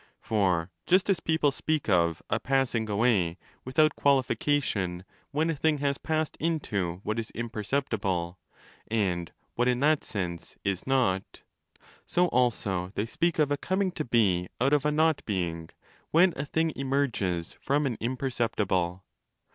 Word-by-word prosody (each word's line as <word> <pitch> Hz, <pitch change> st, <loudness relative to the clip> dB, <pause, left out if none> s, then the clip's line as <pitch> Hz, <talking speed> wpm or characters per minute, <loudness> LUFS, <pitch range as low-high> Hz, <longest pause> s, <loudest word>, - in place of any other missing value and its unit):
* -, -, -49 dB
For 90 Hz, -5 st, 0 dB, 0.2 s
just 185 Hz, +2 st, +4 dB
as 185 Hz, -, +1 dB
people 160 Hz, -3 st, +2 dB
speak 155 Hz, +2 st, -1 dB
of 85 Hz, -5 st, +2 dB
'a -, -, 0 dB
passing 125 Hz, -4 st, 0 dB
away' 100 Hz, -5 st, +2 dB, 0.3 s
without 155 Hz, +4 st, +2 dB
qualification 130 Hz, -9 st, +1 dB, 0.2 s
when 155 Hz, +3 st, 0 dB
a -, -, -2 dB
thing 155 Hz, +1 st, +1 dB
has 140 Hz, -1 st, -1 dB
passed 155 Hz, -1 st, -1 dB
into 100 Hz, -, -1 dB
what 110 Hz, +2 st, -1 dB
is 115 Hz, -, -4 dB
imperceptible 105 Hz, -6 st, -2 dB, 0.5 s
and 90 Hz, -6 st, -1 dB, 0.2 s
what 120 Hz, +1 st, +1 dB
in 125 Hz, -1 st, +2 dB
that 150 Hz, +1 st, +3 dB
sense 90 Hz, -5 st, -5 dB
'is 100 Hz, +2 st, -2 dB
not', 120 Hz, -9 st, 0 dB, 0.6 s
so 175 Hz, -, +1 dB
25 180 Hz, -, +5 dB
also 105 Hz, -7 st, +1 dB
they 105 Hz, -, 0 dB
speak 170 Hz, +8 st, 0 dB
of 150 Hz, -2 st, +2 dB
'a 145 Hz, -, +2 dB
coming 190 Hz, +4 st, 0 dB
to 155 Hz, -, -3 dB
be 100 Hz, -8 st, +2 dB
out 135 Hz, +4 st, +2 dB
of 145 Hz, -1 st, +2 dB
a -, -, +2 dB
not 160 Hz, 0 st, +2 dB
being' 85 Hz, -5 st, -2 dB, 0.4 s
when 175 Hz, +2 st, +5 dB
a 140 Hz, -, -3 dB
thing 160 Hz, +2 st, 0 dB
emerges 125 Hz, -11 st, -1 dB
from 145 Hz, +2 st, +1 dB
an 125 Hz, -4 st, -1 dB
imperceptible. 110 Hz, -8 st, -1 dB
120 Hz, 155 wpm, -28 LUFS, 95-145 Hz, 0.6 s, 25